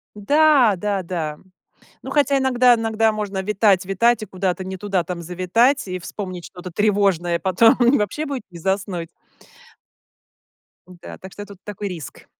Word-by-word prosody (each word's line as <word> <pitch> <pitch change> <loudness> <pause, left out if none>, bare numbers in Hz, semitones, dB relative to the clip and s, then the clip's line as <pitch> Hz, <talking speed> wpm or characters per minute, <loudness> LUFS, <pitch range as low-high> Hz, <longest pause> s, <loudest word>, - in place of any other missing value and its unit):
да-да-да. 205 - +2 0.6
Ну, - - -7
хотя 285 -2 +2
иногда 255 -2 +4
иногда 225 -1 +1
можно 205 -2 -3
витать-витать 205 +2 +2
и - - -5
куда-то 185 -1 -2
не 190 0 -5
туда 195 -1 -1
там 170 0 -6
завитать 185 - +1
и 185 0 -3
вспомнить 185 -1 -7
что-то 180 0 -9
тревожное, 195 -3 +1
потом 190 +5 +4 0.2
вообще 260 +9 -2
будет 275 -4 -4
не 175 - -11
заснуть. 190 -1 -2 1.8
Да. 180 -1 -11
Так 190 - -11
что 205 - -8
тут 200 -2 -15
такой 205 0 -6
риск. 165 -8 -9
195 Hz, 135 wpm, -21 LUFS, 180-225 Hz, 1.8 s, иногда